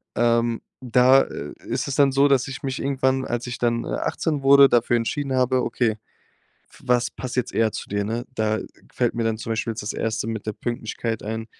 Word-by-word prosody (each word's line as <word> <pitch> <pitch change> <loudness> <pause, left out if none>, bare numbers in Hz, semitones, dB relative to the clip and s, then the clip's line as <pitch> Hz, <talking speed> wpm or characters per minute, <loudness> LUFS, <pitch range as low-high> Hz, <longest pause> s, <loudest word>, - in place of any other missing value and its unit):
Ähm, 115 -1 +2 0.2
da, 125 +2 +5
äh, 75 - -7
ist - - -2
es 135 - -2
dann 140 -1 +4
so, 140 +1 +4
dass 135 -2 +2
ich 135 - -7
mich 135 -1 -3
irgendwann, 130 -1 +1
als 120 +1 -3
ich 125 - -4
dann, 115 -1 0
äh, - - -7
18 155 -4 -2
wurde, 140 0 +8
dafür 120 0 +3
entschieden 135 +4 -2
habe: 130 0 +2
„Okay, 110 -3 0 0.7
f - - -19
was 125 0 +2
passt 130 -1 -7
jetzt 125 - -1
eher 110 -1 +2
zu - - -6
dir“, 100 0 -1
ne? 115 +3 -3
Da 110 -1 0 0.3
fällt - - 0
mir 115 - -1
dann 110 -1 0
zum 115 - -6
Beispiel 115 +1 -2
jetzt 110 -1 -6
das 105 - -3
1. 110 -1 -2
mit 110 -2 -5
der 110 - -1
Pünktlichkeit 115 -1 -4
ein, 110 +1 -4
120 Hz, 215 wpm, -23 LUFS, 115-130 Hz, 0.7 s, wurde